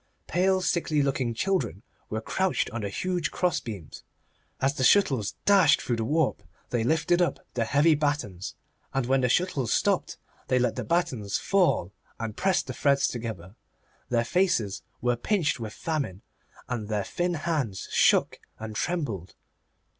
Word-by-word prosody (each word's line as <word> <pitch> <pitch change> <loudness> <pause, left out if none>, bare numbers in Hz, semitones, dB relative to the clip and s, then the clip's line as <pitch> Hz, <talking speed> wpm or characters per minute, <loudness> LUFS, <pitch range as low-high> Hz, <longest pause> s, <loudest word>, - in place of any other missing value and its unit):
Pale, 185 +2 +2
sickly 160 -5 +1
looking 130 -4 -1
children 180 - -1 0.3
were 110 +1 -2
crouched 190 +9 0
on 120 - -4
the 100 - -3
huge 175 - -1
crossbeams. 115 - -3 0.6
As 135 +1 +2
the 130 - -2
shuttles 135 - +3
dashed 195 -6 +6
through 120 - -2
the 115 - -1
warp 150 +5 +1 0.3
they 120 -2 +1
lifted 160 +6 +2
up 175 - +1 0.2
the 115 -2 0
heavy 145 +7 +4
battens, 145 - -2 0.4
and 135 -2 +1
when 135 +1 +2
the 125 - +2
shuttles 140 -6 +1
stopped - - +1 0.3
they 130 - +2
let 125 0 +1
the - - -3
battens 130 - 0
fall 180 - +1 0.3
and 110 -2 -4
pressed 190 -1 +1
the - - -5
threads 140 -1 +2
together. 110 -6 -6 0.5
Their 115 -1 +1
faces 120 - +1 0.2
were 120 0 +2
pinched 160 - 0
with 110 -2 -5
famine, 140 - -3 0.4
and 115 -4 -3
their 105 -2 -1
thin 175 - -1
hands 145 - -2
shook - - +3 0.2
and 110 -1 -7
trembled. 115 - -3
135 Hz, 155 wpm, -27 LUFS, 110-170 Hz, 0.6 s, dashed